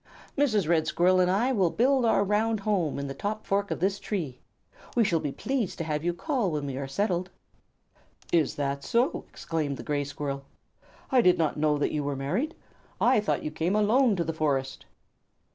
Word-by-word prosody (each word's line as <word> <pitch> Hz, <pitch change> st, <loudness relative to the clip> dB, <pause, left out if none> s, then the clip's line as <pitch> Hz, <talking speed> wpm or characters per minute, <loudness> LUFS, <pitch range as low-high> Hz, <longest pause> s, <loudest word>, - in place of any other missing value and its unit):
"Mrs. 215 Hz, -, +2 dB
Red 160 Hz, -2 st, +2 dB
Squirrel 185 Hz, +3 st, +3 dB
and 180 Hz, 0 st, +3 dB
I 220 Hz, +8 st, +2 dB
will 195 Hz, -8 st, +2 dB
build 255 Hz, +5 st, +2 dB
our 225 Hz, -3 st, +3 dB
round 210 Hz, +1 st, +1 dB
home 195 Hz, -7 st, 0 dB
in 140 Hz, -, -3 dB
the 135 Hz, -, -4 dB
top 210 Hz, +9 st, -4 dB
fork 200 Hz, +1 st, 0 dB
of -, -, -3 dB
this 195 Hz, +3 st, 0 dB
tree. 160 Hz, -, -4 dB, 0.6 s
We 235 Hz, -, +4 dB
shall 180 Hz, -6 st, +2 dB
be 145 Hz, -, -3 dB
pleased 250 Hz, -, -2 dB
to -, -, -2 dB
have 150 Hz, -1 st, -2 dB
you 175 Hz, -, +1 dB
call 240 Hz, -, -1 dB
when 150 Hz, -3 st, -2 dB
we 135 Hz, -2 st, -4 dB
are 135 Hz, 0 st, -4 dB
settled." 180 Hz, +3 st, -1 dB, 1.0 s
"Is 160 Hz, -4 st, +2 dB
that 140 Hz, -1 st, -2 dB
so?" 245 Hz, +7 st, 0 dB
exclaimed 150 Hz, -4 st, -3 dB
the -, -, -7 dB
Gray 145 Hz, -1 st, -1 dB
Squirrel. 140 Hz, -1 st, -4 dB, 0.7 s
"I 260 Hz, -2 st, +5 dB
did 180 Hz, -5 st, +4 dB
not 160 Hz, -2 st, +1 dB
know 150 Hz, 0 st, +2 dB
that 145 Hz, -, 0 dB
you 150 Hz, -1 st, -1 dB
were 140 Hz, 0 st, -2 dB
married. 190 Hz, -, -2 dB, 0.4 s
I 250 Hz, -1 st, +4 dB
thought 210 Hz, -, -1 dB
you 155 Hz, -, -3 dB
came 165 Hz, +5 st, -1 dB
alone 220 Hz, +2 st, +4 dB
to 175 Hz, -, 0 dB
the 165 Hz, 0 st, -3 dB
forest." 135 Hz, -4 st, -1 dB
175 Hz, 200 wpm, -27 LUFS, 150-215 Hz, 1.0 s, I